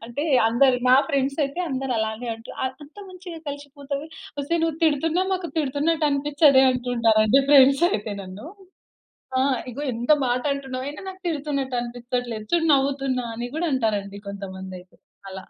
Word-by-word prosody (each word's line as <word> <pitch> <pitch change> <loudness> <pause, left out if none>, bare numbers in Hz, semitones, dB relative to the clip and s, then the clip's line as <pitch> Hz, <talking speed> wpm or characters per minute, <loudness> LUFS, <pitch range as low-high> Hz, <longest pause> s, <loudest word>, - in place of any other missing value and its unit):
అంటే, 265 +6 -4 0.2
అందరు 250 +2 +3
నా 255 - +7
ఫ్రెండ్స్ 275 -1 0
అయితే 280 +6 -4
అందరు 265 -2 -2
అలానే 220 +2 -3
అంటారు. 225 +1 -11 0.3
"అంత 295 +2 -20
మంచిగా 365 -2 -9
కలిసిపోతది. 285 0 -6 0.3
ఒసేయ్! 335 +4 -1
నువ్వు 325 -2 0
తిడుతున్నావ్, 325 +5 +1
మాకు 365 -3 -4
తిడుతున్నట్టు 300 +2 +1
అనిపించదే" 280 -1 +4
అంటుంటారండి 240 -1 +3
ఫ్రెండ్స్ 275 +2 +6
అయితే 210 0 -3
నన్ను. 190 +7 -10 0.9
ఆ! - - +3 0.3
"ఇగో 280 +5 -6
ఎంత 235 +4 0 0.2
మాట 245 +1 0
అంటున్నావు, 275 +3 -6
నాకు 375 0 -11
తిడుతున్నట్టు 280 -4 -2
అనిపించట్లేదు 240 -2 -4
చూడు" 330 -1 +3
నవ్వుతున్నా 270 -2 0
అని 240 +2 -5
గూడా 335 +1 0
అంటారండి 205 -5 -1
కొంతమంది 190 -1 -7
అయితే. 180 - -24 0.3
అలా. 190 0 -8
270 Hz, 145 wpm, -24 LUFS, 235-290 Hz, 0.9 s, నా